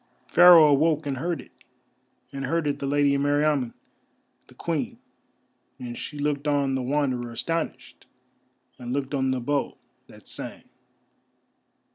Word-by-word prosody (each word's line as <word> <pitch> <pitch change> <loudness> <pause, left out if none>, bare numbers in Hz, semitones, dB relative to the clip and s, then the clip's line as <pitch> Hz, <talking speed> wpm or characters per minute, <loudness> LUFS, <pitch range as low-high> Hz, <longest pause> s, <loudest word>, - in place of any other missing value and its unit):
Pharaoh 175 -3 +8
awoke 155 +2 +2
and 140 -2 -3
heard 170 +5 -2
it, - - -18 0.8
and 135 -1 -4
heard 165 +2 0
it 145 -1 -1
the 140 - -3
Lady 145 0 +2
Meriamun 145 -3 +1 0.7
the - - -19
Queen, - - -3 0.8
and 120 -1 -7
she 150 - -7
looked 145 0 -2
on 140 -2 +1
the 130 - -1
Wanderer 125 -3 -1
astonished, 165 +8 -4 0.7
and 125 0 -5
looked 140 0 -3
on 135 -1 0
the 130 -1 0
bow 140 +3 -2 0.3
that - - -17
sang. - - -6
140 Hz, 135 wpm, -25 LUFS, 130-150 Hz, 0.8 s, Pharaoh